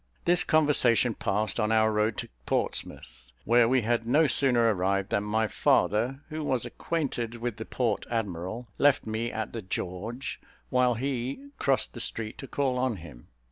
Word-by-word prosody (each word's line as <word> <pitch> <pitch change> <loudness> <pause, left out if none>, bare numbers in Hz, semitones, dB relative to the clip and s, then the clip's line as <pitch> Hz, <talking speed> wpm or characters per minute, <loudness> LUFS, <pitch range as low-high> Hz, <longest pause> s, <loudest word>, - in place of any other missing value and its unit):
This 175 +1 +4
conversation 130 -6 +3
passed 105 +2 -1
on 105 -1 +1
our 110 0 +4
road 105 +1 0
to - - -5 0.2
Portsmouth, 60 +1 -3
where 120 +1 +5
we 130 -2 +3
had 115 0 0
no 150 +6 +4
sooner 120 -5 +4
arrived 95 +1 -1
than 100 - +1
my 110 +1 0
father, 120 +7 +1
who 155 0 -4
was 130 -5 0
acquainted 125 -8 -3
with 120 -2 -4
the 110 - -6
port 115 -5 -1
admiral, 110 +1 -3
left 145 -1 +4
me 110 +2 -2
at 110 0 -4
the 115 - -4
"George," 100 +6 -5 0.3
while 125 -2 +3
he 135 - -3
crossed 135 -2 +1
the 120 - -8
street 110 -1 -2
to 135 - -7
call 130 -3 -1
on 130 -3 0
him. 75 -9 -12
115 Hz, 170 wpm, -28 LUFS, 105-130 Hz, 0.3 s, where